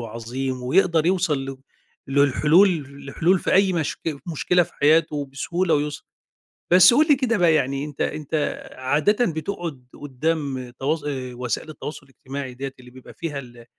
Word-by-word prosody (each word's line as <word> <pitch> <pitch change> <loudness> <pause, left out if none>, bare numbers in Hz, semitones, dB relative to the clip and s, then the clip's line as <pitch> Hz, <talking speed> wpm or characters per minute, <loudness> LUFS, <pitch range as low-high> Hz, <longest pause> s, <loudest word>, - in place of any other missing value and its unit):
وعظيم 120 +3 -5
ويقدَر 165 +4 +2
يوصل 165 -7 +1
ل 135 0 -6 0.5
للحلول 150 +4 +3 0.2
لحلول 175 +6 +2
في - - -2
أي 190 0 +4
مشك 160 -2 -2
مشكلة 175 +2 +2
في 175 - -8
حياته 150 -1 +2
بسهولة 170 +4 0
ويُسر. 145 0 -2 0.7
بس 180 +4 +8
قل 305 +4 +4
لي 290 - +6
كده 250 -3 0
بقى 175 -4 +4
يعني، 140 -1 0
أنتَ 150 -2 -10
أنتَ 150 0 -3 0.4
عادةً 155 - +2
بتقعد 160 -4 -5 0.2
قُدَّام 140 -2 -2
تواصَل 150 +2 -1
آآ، 130 -3 -5
وسائل 125 +5 -4
التواصل 150 -2 -8
الاجتماعي 135 0 -7
ديَّة، 135 +1 -5
اللي 125 0 -14
بيبقى 130 0 -14
فيها 155 -4 -5
ال 120 -3 -11
150 Hz, 150 wpm, -23 LUFS, 135-170 Hz, 0.7 s, بس